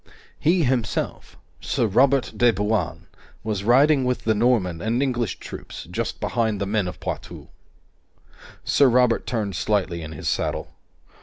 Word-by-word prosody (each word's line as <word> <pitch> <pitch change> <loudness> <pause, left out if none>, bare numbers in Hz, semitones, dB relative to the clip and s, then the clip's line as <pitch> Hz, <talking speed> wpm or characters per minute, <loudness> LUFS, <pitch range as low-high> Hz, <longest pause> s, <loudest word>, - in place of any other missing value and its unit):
He 170 +2 +3
himself, 125 -5 -2 0.2
Sir - - 0
Robert 130 +5 +3
de 120 -1 +4
Bouain, 105 -4 -1 0.4
was 105 -3 -2
riding 135 +5 +4
with 125 0 -1
the 110 - +2
Norman 105 -7 +1
and 115 +5 0
English 120 -5 -1
troops, - - -9
just - - -3
behind 110 -4 -1
the 100 - -1
men 100 -1 0
of 90 - -7
Poitou. - - -6 1.1
Sir 140 -2 +4
Robert 125 -1 +2
turned 105 -6 -2
slightly 95 -5 -1
in 80 0 -7
his - - -6
saddle. - - -2
115 Hz, 145 wpm, -23 LUFS, 100-125 Hz, 1.1 s, de